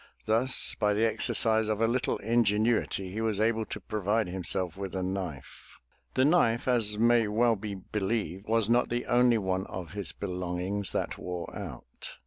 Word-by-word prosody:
Thus 115 +4 +2
by 105 -1 +2
the 110 +2 +2
exercise 110 0 +1
of 110 -1 0
a 115 - +3
little 125 +2 0
ingenuity, 110 -3 +1
he 110 +4 -3
was 110 -3 0
able 110 0 +1
to - - -6
provide 110 0 -1
himself 90 -1 -3
with 95 -1 -6
a 95 - -1
knife. 90 -7 -6 0.4
The 130 - +4
knife, 130 -8 +3
as 110 -4 +3
may 115 0 +4
well 115 +2 +2
be 105 0 -6
believed, 95 -1 -3
was 115 -1 +2
not 120 +1 +2
the 120 +1 -2
only 120 -1 +4
one 95 -1 -2
of 90 -3 -7
his 100 -3 -4
belongings 90 +2 -2
that - - -2
wore 90 -1 -6
out. - - -8
105 Hz, 170 wpm, -29 LUFS, 95-115 Hz, 0.4 s, The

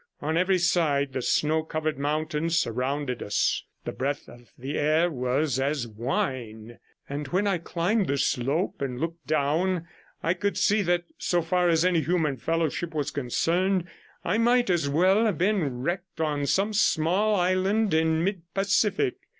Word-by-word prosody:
On 155 +2 -2
every 185 +2 +3
side 155 -6 +1
the 130 - -2
snow 155 +5 +1
covered 155 -1 -3
mountains 155 +3 -1
surrounded 125 +1 -1
us, 100 - 0 0.2
the - - -3
breath 140 +2 -3
of 120 0 -15
the 135 +4 -5
air 155 +4 +2
was 130 +1 0
as 135 -2 -1
wine, 115 -1 -4 0.3
and 145 +1 -4
when 185 +8 0
I 195 -3 +1
climbed 180 +5 0
the 140 - 0
slope 140 +8 -1
and 125 -3 -3
looked 165 +1 -5
down, 160 +4 0 0.4
I 170 - +2
could 200 +3 -2
see 210 +1 +3
that, 175 -2 +1 0.2
so 175 -2 +1
far 180 +1 +2
as 165 +1 +3
any 180 -3 +3
human 155 -5 0
fellowship 165 +1 -2
was 145 -1 -1
concerned, 175 +8 0 0.4
I 200 +6 +1
might 240 -2 +3
as 160 -5 +1
well 185 +9 +3
have 200 -7 -1
been 170 -10 0
wrecked 175 +2 -4
on 145 -3 -1
some 200 +6 +1
small 205 +2 +2
island 190 +2 +1
in 160 0 +2
mid 190 -1 -1
Pacific. 200 - +1
160 Hz, 160 wpm, -26 LUFS, 140-185 Hz, 0.4 s, every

